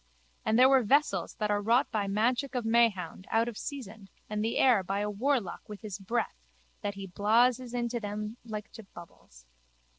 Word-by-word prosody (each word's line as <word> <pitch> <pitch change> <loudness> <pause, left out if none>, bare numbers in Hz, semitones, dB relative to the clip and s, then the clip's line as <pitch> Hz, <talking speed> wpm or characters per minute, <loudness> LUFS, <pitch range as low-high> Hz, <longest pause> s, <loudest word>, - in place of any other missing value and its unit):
And 220 - +2
there 255 +1 +8
were 265 -1 +5
vessels 285 +7 +1
that 210 -3 -1
are 205 0 +1
wrought 235 +5 +2
by 205 -2 -1
magic 245 +7 0
of 245 -2 -1
Mahound 220 -6 +1
out 225 +1 +2
of 240 - -3
seasand 220 -7 -7 0.2
and 210 0 -2
the 225 - -1
air 245 -6 +5
by 195 +2 -2
a 210 0 -1
warlock 230 -3 -1
with 210 -1 -8
his 210 -3 -6
breath 195 - -2 0.4
that 200 -1 -3
he 195 0 -6
blases 235 +6 +2
in 240 -1 0
to 240 0 -2
them 210 +1 -5
like 220 -2 -7
to - - -10
bubbles. 65 - -14
220 Hz, 190 wpm, -30 LUFS, 205-240 Hz, 0.4 s, there